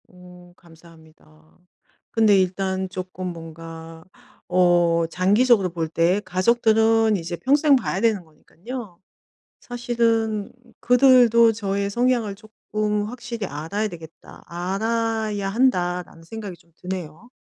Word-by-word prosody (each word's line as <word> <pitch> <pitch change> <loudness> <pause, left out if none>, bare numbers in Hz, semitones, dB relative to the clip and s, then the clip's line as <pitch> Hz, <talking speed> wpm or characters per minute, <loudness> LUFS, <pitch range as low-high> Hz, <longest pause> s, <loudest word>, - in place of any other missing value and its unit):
오. 180 -1 -16
감사합니다. 160 -2 -20 0.5
근데 215 -3 +4
일단 190 0 -1
쪼끔 185 0 -6
뭔가 165 -1 -9 0.4
어 175 -2 +3
장기적으로 200 +3 +3
볼 165 -1 -3
때 170 +4 +2
가족들은 220 +3 +2
이제 175 0 -5
평생 285 - +3
봐야 255 - -2
되는 220 -5 +1
거니깐요. 175 - -10 0.6
사실은 230 -3 -1 0.3
'그들도 245 -2 +5
저의 200 -2 -2
성향을 240 -3 0
쪼끔 210 0 -3
확실히 235 -1 -6
알아야 165 +9 -3
되겠다. 165 -4 -13
알아야 215 +3 -2
한다.'라는 180 -7 0
생각이 205 0 -8
좀 170 - -28
드네요. 180 +3 -7
195 Hz, 255 characters per minute, -22 LUFS, 175-225 Hz, 0.6 s, 그들도